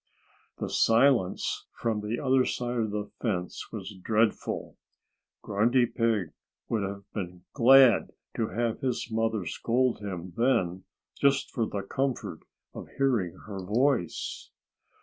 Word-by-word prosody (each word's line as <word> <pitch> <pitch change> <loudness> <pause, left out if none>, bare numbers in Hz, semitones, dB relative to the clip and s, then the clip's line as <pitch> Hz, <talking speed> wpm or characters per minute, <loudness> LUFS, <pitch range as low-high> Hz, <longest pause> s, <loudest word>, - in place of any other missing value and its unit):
The - - -3
silence 115 -4 +2
from 110 -2 -1
the 105 +3 -3
other 130 -1 +3
side 120 -1 -2
of 110 -1 0
the 105 0 -4
fence 90 -7 -3
was 105 -1 -6
dreadful. 110 +3 -1 0.7
Grunty 120 +5 +3
Pig 115 -7 0 0.4
would 110 - 0
have 100 0 -4
been 90 -3 -5
glad 130 -2 +6 0.3
to 115 - 0
have 115 0 -1
his 125 -3 -2
mother 110 -3 0
scold 120 +7 0
him 95 -4 -6
then, 95 -8 +1 0.3
just 140 -1 +2
for 115 -3 -1
the 100 -1 -4
comfort 135 +4 -2 0.3
of - - -8
hearing 120 -11 +1
her 100 -3 -6
voice. 115 0 0
110 Hz, 130 wpm, -28 LUFS, 100-125 Hz, 0.7 s, glad